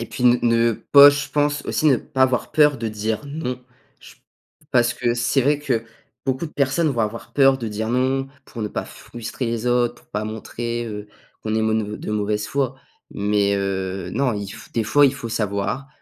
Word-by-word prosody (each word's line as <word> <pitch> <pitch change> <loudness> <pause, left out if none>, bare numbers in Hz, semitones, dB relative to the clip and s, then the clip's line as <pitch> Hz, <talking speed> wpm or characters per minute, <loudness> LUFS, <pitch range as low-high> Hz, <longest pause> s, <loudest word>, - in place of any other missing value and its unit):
...et 115 - -4
puis, 125 - -4
ne 120 0 +6
ne 115 0 +3
pas 140 +6 +7
je 145 +1 -3
pense 145 0 0
aussi 155 - 0
ne 140 -4 +6
pas 130 +2 -1
avoir 130 -2 +1
peur 150 -2 +4
de 115 0 -2
dire 110 +3 -3
non. 140 -4 -4 0.4
J - - -15 0.6
parce 120 -2 +3
que 120 -1 0
c'est 120 +3 +1
vrai 145 +3 +2
que 125 -6 -1 0.4
beaucoup 130 +5 -1
de - - -11
personnes 140 +4 +1
vont 120 -4 -1
avoir 110 +1 -3
peur 135 -1 +5
de 115 -3 -4
dire 110 +1 -3
non 130 +2 +1 0.2
pour 115 - -9
ne - - -1
pas - - -4
frustrer 120 +2 -7
les 115 0 -2
autres, 120 -1 +2
pour - - -22
pas 105 +1 -2
montrer, 115 +2 -4
heu, 105 -1 -6 0.4
qu'on 110 0 -2
est 110 - +1
m 110 -1 0
de - - -6
mauvaise 105 0 -1
foi. 135 -2 -1 0.4
Mais 100 0 +1
heu, 95 -2 -2
non, 130 +4 +1
il 100 -2 -4
f - - -12
des 115 - 0
fois, 145 +6 +5
il 135 - +1
faut 120 -4 -6
savoir 105 +4 -2
120 Hz, 210 wpm, -22 LUFS, 105-135 Hz, 0.6 s, pas